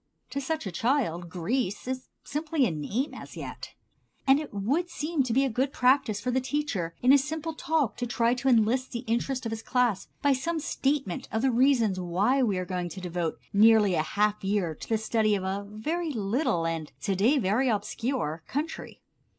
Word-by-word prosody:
To 280 Hz, -, -2 dB
such 315 Hz, +1 st, -2 dB
a 190 Hz, -, -3 dB
child 180 Hz, -, 0 dB
Greece 200 Hz, +6 st, -2 dB
is 260 Hz, 0 st, -4 dB, 0.2 s
simply 300 Hz, -1 st, 0 dB
a 215 Hz, -, 0 dB
name 200 Hz, -, -2 dB
as -, -, -10 dB
yet. -, -, -7 dB, 0.5 s
And 270 Hz, +1 st, +5 dB
it 305 Hz, -, -6 dB
would 270 Hz, -, 0 dB
seem 310 Hz, -2 st, -1 dB
to 255 Hz, -3 st, -1 dB
be 270 Hz, +4 st, +3 dB
a -, -, +2 dB
good 260 Hz, +5 st, 0 dB
practice 255 Hz, -5 st, +3 dB
for 250 Hz, +5 st, -2 dB
the 260 Hz, +1 st, +1 dB
teacher 250 Hz, -, -2 dB
in 255 Hz, +2 st, +7 dB
a 285 Hz, -, +7 dB
simple 315 Hz, +3 st, -3 dB
talk 310 Hz, -6 st, 0 dB
to 245 Hz, -, -2 dB
try 235 Hz, 0 st, +2 dB
to 255 Hz, +2 st, -3 dB
enlist 245 Hz, +2 st, +2 dB
the 235 Hz, -, -3 dB
interest 245 Hz, +3 st, -1 dB
of 225 Hz, -, -2 dB
his 225 Hz, 0 st, -4 dB
class 245 Hz, -5 st, +1 dB, 0.2 s
by 285 Hz, -1 st, +5 dB
some 320 Hz, +6 st, -1 dB
statement 275 Hz, -, -1 dB
of 220 Hz, +3 st, -1 dB
the 265 Hz, -, +3 dB
reasons 235 Hz, -6 st, +3 dB
why 195 Hz, +10 st, +1 dB
we 210 Hz, -7 st, +1 dB
are 185 Hz, -, -2 dB
going 180 Hz, -1 st, -3 dB
to 190 Hz, -, -8 dB
devote 175 Hz, -2 st, -3 dB, 0.2 s
nearly 210 Hz, -1 st, +6 dB
a 155 Hz, -, +2 dB
half 210 Hz, +6 st, 0 dB
year 195 Hz, -4 st, 0 dB
to -, -, -11 dB
the 225 Hz, -, +2 dB
study 220 Hz, -1 st, +1 dB
of 190 Hz, -, -3 dB
a 195 Hz, +2 st, -3 dB
very 315 Hz, +11 st, -2 dB
little, 210 Hz, -, 0 dB
and 165 Hz, -2 st, -3 dB
to 195 Hz, -2 st, 0 dB
day 230 Hz, +10 st, +3 dB
very 240 Hz, +3 st, +2 dB
obscure, 210 Hz, -, -2 dB
country. 300 Hz, +4 st, -5 dB
235 Hz, 200 wpm, -28 LUFS, 195-270 Hz, 0.5 s, in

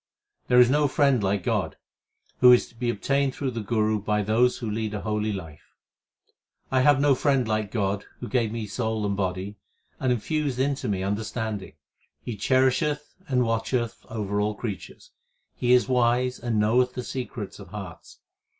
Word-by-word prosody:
There 125 Hz, 0 st, +5 dB
is 125 Hz, -, +8 dB
no 145 Hz, +1 st, +3 dB
friend 140 Hz, -3 st, +2 dB
like 100 Hz, -1 st, 0 dB
God, 100 Hz, -9 st, -1 dB, 0.6 s
who 125 Hz, 0 st, +8 dB
is 125 Hz, -, +5 dB
to -, -, -22 dB
be 120 Hz, +1 st, -2 dB
obtained 135 Hz, +4 st, 0 dB
through 135 Hz, -2 st, -2 dB
the 115 Hz, -2 st, -4 dB
Guru 110 Hz, 0 st, +1 dB
by 105 Hz, 0 st, 0 dB
those 115 Hz, +4 st, +2 dB
who 115 Hz, -, -5 dB
lead 110 Hz, 0 st, -2 dB
a 105 Hz, -, -4 dB
holy 105 Hz, 0 st, -1 dB
life: 80 Hz, -7 st, -9 dB, 1.0 s
I 130 Hz, -1 st, +3 dB
have 145 Hz, 0 st, +5 dB
no 145 Hz, 0 st, +4 dB
friend 135 Hz, -2 st, +1 dB
like 110 Hz, -1 st, -1 dB
God 100 Hz, -2 st, -1 dB
Who -, -, -6 dB
gave 115 Hz, -4 st, 0 dB
me 115 Hz, -1 st, -4 dB
soul 110 Hz, 0 st, -2 dB
and 100 Hz, -1 st, 0 dB
body, 95 Hz, +1 st, -3 dB, 0.4 s
and 130 Hz, -1 st, +1 dB
infused 140 Hz, +3 st, -1 dB
into 135 Hz, +1 st, 0 dB
me 95 Hz, -2 st, -1 dB
under 105 Hz, +3 st, -1 dB
standing. 110 Hz, -3 st, -4 dB, 0.5 s
He 120 Hz, -, -4 dB
cherisheth 130 Hz, +6 st, +1 dB
and 125 Hz, -2 st, +2 dB
watcheth 115 Hz, +1 st, -1 dB
over 105 Hz, -2 st, -2 dB
all 105 Hz, 0 st, 0 dB
creatures; 105 Hz, -3 st, -7 dB, 0.4 s
He 125 Hz, -, 0 dB
is 125 Hz, -3 st, +5 dB
wise 125 Hz, 0 st, +2 dB
and 115 Hz, -3 st, -1 dB
knoweth 125 Hz, +4 st, +2 dB
the 125 Hz, -, -3 dB
secrets 120 Hz, -6 st, -6 dB
of 100 Hz, -, -10 dB
hearts. 95 Hz, -2 st, -10 dB
115 Hz, 175 wpm, -25 LUFS, 105-125 Hz, 1.0 s, is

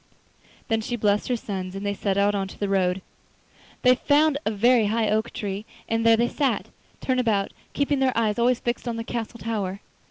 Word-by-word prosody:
Then 225 Hz, -1 st, +1 dB
she 240 Hz, +2 st, -3 dB
blessed 210 Hz, -2 st, +1 dB
her 250 Hz, -, +1 dB
sons 190 Hz, -4 st, -5 dB
and 195 Hz, +1 st, -5 dB
they 200 Hz, -, 0 dB
set 200 Hz, -1 st, -1 dB
out 200 Hz, +1 st, +3 dB
into 195 Hz, -1 st, -3 dB
the 205 Hz, -, -1 dB
wood. 185 Hz, -1 st, +1 dB, 0.8 s
They 250 Hz, -1 st, +7 dB
found 290 Hz, +3 st, +3 dB
a -, -, +4 dB
very 225 Hz, +1 st, +4 dB
high 220 Hz, 0 st, +1 dB
oak 220 Hz, +2 st, 0 dB
tree, 205 Hz, -2 st, -4 dB, 0.2 s
and 225 Hz, 0 st, 0 dB
there 230 Hz, 0 st, +6 dB
they 235 Hz, +1 st, +2 dB
sat, 270 Hz, -1 st, -1 dB, 0.3 s
turn 255 Hz, -1 st, +1 dB
about, 210 Hz, -5 st, +1 dB, 0.2 s
keeping 285 Hz, 0 st, +1 dB
their 260 Hz, -2 st, +1 dB
eyes 220 Hz, 0 st, +1 dB
always 245 Hz, +1 st, +3 dB
fixed 240 Hz, +1 st, -3 dB
on 235 Hz, -, -1 dB
the 230 Hz, -, -3 dB
castle 235 Hz, 0 st, -5 dB
tower. 200 Hz, -4 st, -3 dB
225 Hz, 200 wpm, -25 LUFS, 200-240 Hz, 0.8 s, They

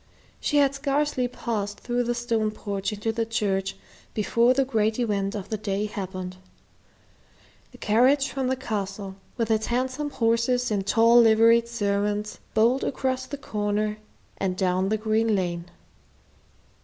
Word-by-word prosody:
She 295 Hz, -, 0 dB
had 280 Hz, -1 st, +4 dB
scarcely 275 Hz, -2 st, 0 dB
passed 210 Hz, -4 st, -4 dB
through 245 Hz, 0 st, -1 dB
the 240 Hz, 0 st, 0 dB
stone 230 Hz, -2 st, 0 dB
porch 200 Hz, -1 st, -4 dB
into 210 Hz, +2 st, -2 dB
the 230 Hz, +1 st, -1 dB
church 195 Hz, -4 st, -1 dB, 0.4 s
before 235 Hz, +3 st, +3 dB
the 270 Hz, 0 st, +2 dB
great 220 Hz, -4 st, +1 dB
event 205 Hz, -4 st, -1 dB
of 200 Hz, -1 st, -6 dB
the 220 Hz, -, -2 dB
day 200 Hz, 0 st, -1 dB
happened. 185 Hz, -3 st, -5 dB, 1.3 s
The -, -, -14 dB
carriage 260 Hz, +6 st, +3 dB
from 265 Hz, -2 st, -2 dB
the 260 Hz, -, +1 dB
Castle, 200 Hz, -5 st, -4 dB, 0.2 s
with 230 Hz, -2 st, 0 dB
its 220 Hz, 0 st, +1 dB
handsome 260 Hz, +4 st, -1 dB
horses 235 Hz, 0 st, +1 dB
and 200 Hz, -2 st, -1 dB
tall 230 Hz, +2 st, +6 dB
liveried 230 Hz, +1 st, +5 dB
servants, 205 Hz, -2 st, -1 dB, 0.2 s
bowled 235 Hz, +5 st, +3 dB
around 260 Hz, -1 st, -1 dB
the 285 Hz, -, -5 dB
corner 210 Hz, -3 st, -2 dB, 0.4 s
and 185 Hz, -2 st, -1 dB
down 185 Hz, 0 st, +1 dB
the 215 Hz, -, +1 dB
green 220 Hz, 0 st, +1 dB
lane. 175 Hz, -3 st, -2 dB
220 Hz, 145 wpm, -25 LUFS, 205-245 Hz, 1.3 s, tall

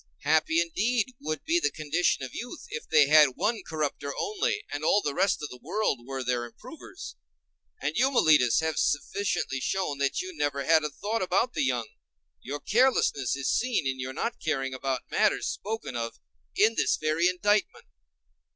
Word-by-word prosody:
Happy 160 Hz, +2 st, +3 dB
indeed 220 Hz, +9 st, 0 dB
would 155 Hz, 0 st, -4 dB
be 335 Hz, +2 st, +2 dB
the -, -, +1 dB
condition 155 Hz, 0 st, 0 dB
of 130 Hz, -, -7 dB
youth 245 Hz, +7 st, -7 dB
if 465 Hz, -, -6 dB
they 150 Hz, -, +6 dB
had 150 Hz, -3 st, +6 dB
one 220 Hz, 0 st, 0 dB
corrupter 150 Hz, -3 st, -3 dB
only, 425 Hz, 0 st, -1 dB
and 145 Hz, +1 st, -4 dB
all 200 Hz, -, +4 dB
the 145 Hz, -8 st, -2 dB
rest 185 Hz, -1 st, +1 dB
of 150 Hz, -, -4 dB
the 125 Hz, -, -11 dB
world 170 Hz, -, -1 dB
were 135 Hz, -1 st, -4 dB
their 125 Hz, -1 st, -1 dB
improvers. 120 Hz, -, -10 dB, 0.6 s
And 145 Hz, +2 st, -2 dB
you, 260 Hz, +3 st, +3 dB
Meletus, 155 Hz, -, +4 dB
have 160 Hz, -1 st, -1 dB
sufficiently 145 Hz, -3 st, -1 dB
shown 150 Hz, -2 st, -2 dB
that 140 Hz, -1 st, 0 dB
you 370 Hz, -1 st, -5 dB
never 140 Hz, -, -1 dB
had 160 Hz, 0 st, +4 dB
a 150 Hz, -, -1 dB
thought 210 Hz, +10 st, -3 dB
about 185 Hz, +7 st, +1 dB
the -, -, -1 dB
young: 125 Hz, -3 st, 0 dB, 0.5 s
your 145 Hz, +3 st, -5 dB
carelessness 210 Hz, -, +2 dB
is 140 Hz, -1 st, -1 dB
seen 245 Hz, -, 0 dB
in 130 Hz, -1 st, -2 dB
your 130 Hz, +1 st, -4 dB
not 230 Hz, -, -3 dB
caring 135 Hz, -4 st, -2 dB
about 130 Hz, -1 st, -2 dB
matters -, -, +2 dB
spoken 220 Hz, -, -4 dB
of 115 Hz, -1 st, -4 dB, 0.4 s
in 220 Hz, +2 st, +4 dB
this -, -, +1 dB
very 155 Hz, +3 st, +1 dB
indictment. 205 Hz, +3 st, 0 dB
155 Hz, 180 wpm, -27 LUFS, 140-210 Hz, 0.6 s, they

